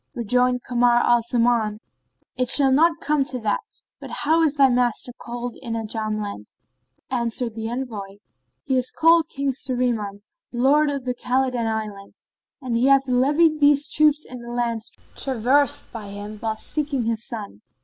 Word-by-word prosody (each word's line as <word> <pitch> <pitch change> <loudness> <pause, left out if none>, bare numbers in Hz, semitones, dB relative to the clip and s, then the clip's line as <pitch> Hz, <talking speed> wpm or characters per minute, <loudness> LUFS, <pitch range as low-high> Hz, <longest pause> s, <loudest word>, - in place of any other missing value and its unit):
Rejoined 250 +2 +1
Kamar 245 -1 +2
al 240 0 +4
Zaman, 230 -2 0 0.6
"It 255 -1 -1
shall 270 -1 +6
not 325 +4 +3
come 300 -2 +1
to 265 -2 -5
that; 210 -2 -3 0.2
but - - -9
how 320 +3 +1
is 305 -3 +2
thy 275 -2 +6
master 245 -1 0
called 240 0 -6
in 235 -3 -5
Ajam 215 -1 -3
land?" 200 - -6 0.6
Answered 235 -1 -1
the 225 0 -5
envoy, 225 -6 -5 0.5
"He 265 -2 +1
is 255 - -1
called 330 0 +4
King 275 0 -2
Shahriman, 240 -6 -2 0.3
lord 280 +5 +3
of 280 -3 -4
the 250 - -1
Khбlidan 250 -1 -1
Islands; 210 -3 -6 0.3
and 255 -4 -3
he 240 +3 +2
hath 275 0 +4
levied 295 +5 +3
these 290 0 +4
troops 305 0 +2
in 250 - -9
the 235 - -9
lands 235 -2 -2 0.2
traversed 265 +2 +1
by 220 -3 -8
him, 205 +1 -8
whilst 220 -1 -3
seeking 290 -4 -1
his 225 0 -2
son." 205 - -6
245 Hz, 160 wpm, -23 LUFS, 225-275 Hz, 0.6 s, shall